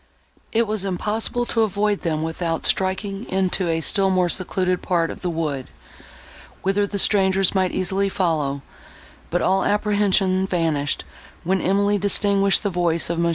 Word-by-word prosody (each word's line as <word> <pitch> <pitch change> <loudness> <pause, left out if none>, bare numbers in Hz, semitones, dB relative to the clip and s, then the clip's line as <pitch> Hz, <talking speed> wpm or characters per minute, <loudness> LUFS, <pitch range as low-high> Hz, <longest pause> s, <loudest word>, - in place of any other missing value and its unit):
It 230 +1 +2
was 215 -2 -2
impossible 210 +5 -2
to 230 - 0
avoid 205 -1 0
them 160 -3 -1
without 165 0 -3
striking 195 +3 -1
into 190 -1 0
a 165 0 0
still 195 +4 +2
more 185 -2 +2
secluded 185 0 -1
part 170 -2 0
of - - -10
the 180 - -2
wood, 150 -6 -3 1.0
whither 200 +2 +1
the 200 - -4
strangers 195 -1 +3
might 185 -2 +1
easily 195 +2 0
follow; 150 -7 -1 0.7
but 175 - 0
all 190 +1 +2
apprehension 200 -2 +1
vanished, 160 -6 -1 0.4
when 190 +2 0
Emily 200 +2 +2
distinguished 200 0 +2
the 200 - -1
voice 170 -2 +1
of 170 - -2
Mons. 170 0 +2
190 Hz, 155 wpm, -22 LUFS, 170-200 Hz, 1.0 s, strangers